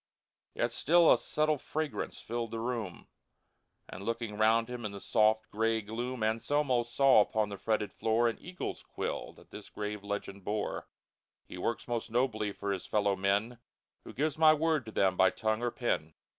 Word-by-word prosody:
Yet -, -, 0 dB
still 170 Hz, +2 st, +5 dB
a -, -, +3 dB
subtile 155 Hz, -1 st, 0 dB
fragrance 155 Hz, +1 st, -4 dB
filled 115 Hz, 0 st, -4 dB
the 115 Hz, -, -4 dB
room; 115 Hz, -6 st, -4 dB, 0.8 s
And 95 Hz, -, -8 dB
looking 115 Hz, -1 st, -3 dB
round 110 Hz, +2 st, +3 dB
him 125 Hz, -1 st, -6 dB
in 105 Hz, -1 st, -4 dB
the 100 Hz, -, -7 dB
soft, 110 Hz, +1 st, +2 dB
gray 115 Hz, +1 st, +1 dB
gloom, 115 Hz, +3 st, -4 dB
Anselmo 125 Hz, +4 st, +1 dB
saw 120 Hz, 0 st, +5 dB
upon 105 Hz, 0 st, 0 dB
the 100 Hz, -, -6 dB
fretted 110 Hz, -2 st, -1 dB
floor 115 Hz, +2 st, +2 dB
An 115 Hz, -, -2 dB
eagle's 180 Hz, +1 st, -5 dB
quill -, -, -4 dB
that -, -, -19 dB
this -, -, -10 dB
grave 105 Hz, -1 st, -5 dB
legend 100 Hz, -1 st, -5 dB
bore: 105 Hz, +2 st, -3 dB, 0.3 s
" -, -, -63 dB
He 90 Hz, -, -8 dB
works 115 Hz, +6 st, -2 dB
most 120 Hz, -1 st, -2 dB
nobly 110 Hz, -3 st, 0 dB
for 100 Hz, 0 st, -4 dB
his 95 Hz, -2 st, -4 dB
fellow 100 Hz, -2 st, +2 dB
men 100 Hz, +5 st, 0 dB, 0.4 s
Who -, -, -9 dB
gives 155 Hz, +3 st, -1 dB
My 155 Hz, -1 st, +7 dB
word 155 Hz, -5 st, 0 dB
to -, -, -6 dB
them, 95 Hz, -3 st, +2 dB
by 95 Hz, -, +6 dB
tongue 110 Hz, +3 st, -1 dB
or 120 Hz, -, +1 dB
pen 115 Hz, -, -2 dB
115 Hz, 185 wpm, -31 LUFS, 105-125 Hz, 0.8 s, My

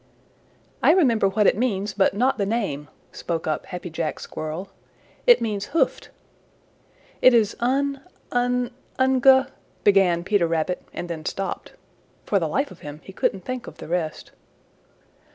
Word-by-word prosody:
"I 315 Hz, -, +6 dB
remember 245 Hz, -, +3 dB
what 205 Hz, +2 st, +1 dB
it -, -, +5 dB
means, 205 Hz, -3 st, -1 dB
but 195 Hz, -1 st, +2 dB
not 255 Hz, +3 st, +1 dB
the 200 Hz, -, +1 dB
name," 195 Hz, -11 st, -2 dB, 0.2 s
spoke 165 Hz, -2 st, -4 dB
up 155 Hz, -1 st, -2 dB
Happy 180 Hz, -2 st, -6 dB
Jack 160 Hz, -1 st, -3 dB
Squirrel. 155 Hz, +5 st, -6 dB, 0.6 s
"It 485 Hz, -, +7 dB
means 210 Hz, -3 st, -2 dB
hoofed." -, -, +1 dB, 1.1 s
"It 255 Hz, -1 st, +7 dB
is 215 Hz, -3 st, +3 dB
Un 275 Hz, +3 st, 0 dB, 0.3 s
Un 245 Hz, 0 st, 0 dB, 0.3 s
Ungu 265 Hz, 0 st, +5 dB, 0.2 s
" -, -, -36 dB
began 190 Hz, -4 st, +4 dB
Peter 195 Hz, -3 st, +2 dB
Rabbit 165 Hz, +2 st, -1 dB
and 175 Hz, -, -5 dB
then 165 Hz, -2 st, -5 dB
stopped. 195 Hz, +3 st, -4 dB, 0.5 s
For 200 Hz, -, +2 dB
the 165 Hz, -, -1 dB
life 275 Hz, -, -1 dB
of -, -, -13 dB
him 150 Hz, 0 st, -9 dB
he 190 Hz, -, -11 dB
couldn't 190 Hz, -1 st, -1 dB
think 255 Hz, -1 st, -5 dB
of -, -, -10 dB
the -, -, -9 dB
rest. 165 Hz, -2 st, -3 dB
200 Hz, 155 wpm, -24 LUFS, 170-250 Hz, 1.1 s, It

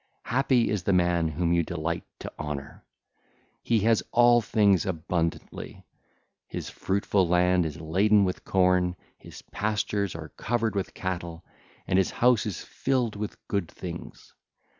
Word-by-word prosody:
Happy 125 Hz, -1 st, +2 dB
is 105 Hz, -, -1 dB
the 100 Hz, -, +1 dB
man 85 Hz, -2 st, +2 dB
whom 85 Hz, +2 st, 0 dB
you 85 Hz, -, +3 dB
delight 85 Hz, 0 st, -3 dB
to -, -, -8 dB
honour! 75 Hz, -2 st, -6 dB, 0.8 s
He 115 Hz, -3 st, +1 dB
has 115 Hz, +1 st, +3 dB
all 120 Hz, 0 st, +5 dB
things 100 Hz, -4 st, +3 dB
abundantly: 85 Hz, -1 st, -3 dB, 0.6 s
his -, -, -6 dB
fruitful 95 Hz, -1 st, 0 dB
land 90 Hz, 0 st, +3 dB
is 80 Hz, +2 st, -7 dB
laden 100 Hz, +6 st, +3 dB
with 90 Hz, -, -3 dB
corn, 90 Hz, -1 st, +2 dB, 0.2 s
his -, -, -12 dB
pastures 105 Hz, -2 st, -1 dB
are 80 Hz, -1 st, -7 dB
covered 115 Hz, -, -1 dB
with 100 Hz, -2 st, -3 dB
cattle, 85 Hz, -2 st, -5 dB, 0.4 s
and 95 Hz, -, +2 dB
his 95 Hz, -, +2 dB
house 120 Hz, -3 st, +3 dB
is 100 Hz, -, -4 dB
filled 125 Hz, -5 st, -1 dB
with 105 Hz, 0 st, -6 dB
good 100 Hz, -5 st, -1 dB
things. 85 Hz, -2 st, -9 dB
95 Hz, 140 wpm, -27 LUFS, 85-105 Hz, 0.8 s, all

